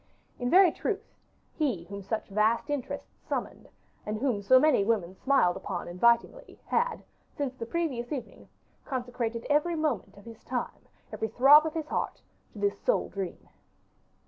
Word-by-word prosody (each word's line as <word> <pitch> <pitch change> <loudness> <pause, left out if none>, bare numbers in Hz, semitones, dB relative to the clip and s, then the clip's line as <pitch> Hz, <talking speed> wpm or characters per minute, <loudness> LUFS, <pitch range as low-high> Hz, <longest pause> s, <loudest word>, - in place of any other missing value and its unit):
In 245 0 -1
very 365 +1 +7
truth, 430 0 -4 0.4
he 260 - -1
whom 200 +3 -8
such 215 +3 -4
vast 220 +7 +1
interests 285 -4 -5
summoned, - - -4 0.3
and 210 +1 -3
whom 235 -4 0
so 255 +6 +6
many 295 -7 +4
women 200 -5 0
smiled 260 -8 +2
upon 190 -2 -5
invitingly, 235 - +1
had, 480 0 0 0.3
since 280 -3 -2
the 230 -3 -7
previous 265 -7 -2
evening, 275 -4 -7 0.3
consecrated 245 -3 -3
every 300 +4 +2
moment 295 -11 -2
of 200 - -15
his 230 -1 -12
time, 245 -1 -4 0.3
every 220 - -2
throb 275 +8 +7
of 315 - -6
his 315 -2 -3
heart, - - -2 0.3
to - - -13
this 405 0 0
sole - - +1
dream. 195 -3 -6
245 Hz, 155 wpm, -29 LUFS, 215-300 Hz, 0.4 s, very